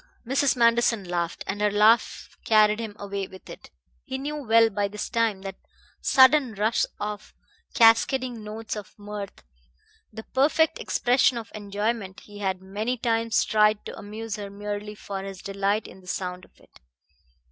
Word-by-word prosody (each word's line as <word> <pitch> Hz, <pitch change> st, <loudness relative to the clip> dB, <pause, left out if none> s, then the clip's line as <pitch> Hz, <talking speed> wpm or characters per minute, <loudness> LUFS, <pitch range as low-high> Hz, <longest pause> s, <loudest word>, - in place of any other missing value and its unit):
Mrs. 270 Hz, +3 st, +2 dB
Manderson 235 Hz, -2 st, +3 dB
laughed, 175 Hz, -1 st, -3 dB
and 205 Hz, +2 st, -4 dB
her 210 Hz, -, +3 dB
laugh 210 Hz, +3 st, +2 dB
carried 215 Hz, -1 st, +4 dB
him 220 Hz, -3 st, -5 dB
away 200 Hz, -1 st, -4 dB
with 190 Hz, -, -14 dB
it. -, -, -11 dB, 0.3 s
He 265 Hz, -3 st, -5 dB
knew 290 Hz, +3 st, -4 dB
well 225 Hz, -4 st, +4 dB
by 205 Hz, 0 st, 0 dB
this 210 Hz, +1 st, -6 dB
time 225 Hz, -4 st, 0 dB
that 195 Hz, -1 st, -6 dB, 0.4 s
sudden 260 Hz, -3 st, +5 dB
rush 215 Hz, +3 st, +1 dB
of 210 Hz, 0 st, -6 dB, 0.4 s
cascading 235 Hz, +1 st, +4 dB
notes 215 Hz, +1 st, -6 dB
of 210 Hz, -2 st, -9 dB
mirth, 205 Hz, -, -8 dB, 0.7 s
the 220 Hz, +1 st, -8 dB
perfect 300 Hz, +6 st, +2 dB
expression 245 Hz, 0 st, +2 dB
of 230 Hz, -1 st, -7 dB
enjoyment; 205 Hz, -1 st, -3 dB
he 205 Hz, -1 st, -13 dB
had 190 Hz, -2 st, -2 dB
many 215 Hz, +6 st, -3 dB
times 230 Hz, -1 st, +1 dB
tried 210 Hz, -1 st, +3 dB
to -, -, -7 dB
amuse 215 Hz, +1 st, -6 dB
her 205 Hz, -1 st, -6 dB
merely 205 Hz, +1 st, -6 dB
for 200 Hz, -2 st, -6 dB
his 195 Hz, -1 st, -8 dB
delight 200 Hz, +2 st, -1 dB
in 190 Hz, -, -14 dB
the 180 Hz, -, -19 dB
sound 180 Hz, -1 st, -4 dB
of -, -, -28 dB
it. -, -, -22 dB
210 Hz, 160 wpm, -25 LUFS, 200-230 Hz, 0.7 s, sudden